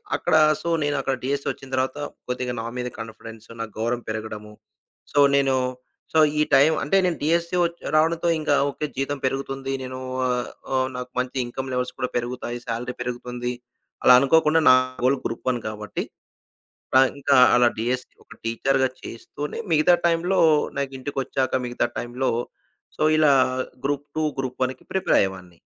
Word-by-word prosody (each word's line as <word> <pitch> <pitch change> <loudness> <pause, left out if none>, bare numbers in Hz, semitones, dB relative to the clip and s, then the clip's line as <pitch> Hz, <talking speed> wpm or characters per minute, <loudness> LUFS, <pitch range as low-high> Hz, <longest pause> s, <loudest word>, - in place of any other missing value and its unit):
అక్కడ - - -1 0.3
సో, 170 - -3
నేనక్కడ 140 -2 0
డీఎస్సీ 140 +1 -2
ఒచ్చిన 135 -1 -12
తరువాత 130 +2 -1 0.3
కొద్దిగా 125 0 -2
నా 115 - -4
మీద 125 0 -2
కాన్ఫిడెన్సు, 115 0 -10
నా - - -1
గౌరవం 120 +2 -1
పెరగడము. 110 -1 -5 0.6
సో, 145 - +3 0.2
నేను 135 -1 +3 0.6
సో 160 - +4 0.2
ఈ - - +4
టైం 140 +4 +6
అంటే 150 +8 +2
నేను 175 -3 0
డీఎస్సీ 170 +3 +1
ఒచ్ 170 0 -2 0.2
రావడంతో 165 +2 +2
ఇంకా 150 -2 +1
ఓకే. 145 +2 -3
జీతం 135 +1 -1
పెరుగుతుంది. 135 0 -3
నేను 130 0 -6 0.3
ఆహ్, 125 -1 -1 0.2
ఓహ్, 130 0 +2
నాకు 125 0 -5
మంచి 125 +1 -3
ఇన్‌కమ్ 130 +2 -5
లెవెల్స్ 125 0 -1
కూడా 125 - -2
పెరుగుతాయి, 120 0 -4
సాలరీ 120 +2 -3
పెరుగుతుంది. 125 0 -4 0.5
అలా - - +8
అనుకోకుండా 155 +3 +4
నా 130 - +9 0.3
గోల్ 130 +2 +3
గ్రూప్-1 120 +1 -2
కాబట్టి 105 -1 -4 0.9
పాన్ 130 0 +6
ఇంకా 140 0 +3 0.2
అలా 120 0 +5
డీఎస్సీ 125 +3 -2
ఒక - - -14
టీచర్‌గా 130 +3 +1
చేస్తూనే, 145 +5 -7
మిగతా 155 +3 +5
టైంలో 170 +3 +1 0.4
నాకింటికొచ్చాక 135 -1 -2
మిగతా 120 0 -1
టైంలో 125 +2 -2 0.7
సో - - 0
ఇలా 150 -3 +5 0.5
గ్రూప్-2, 145 +2 -2 0.2
గ్రూప్-1కి 130 0 -3
ప్రిపేరయ్యేవాన్ని. 95 - 0
130 Hz, 140 wpm, -24 LUFS, 120-145 Hz, 0.9 s, నా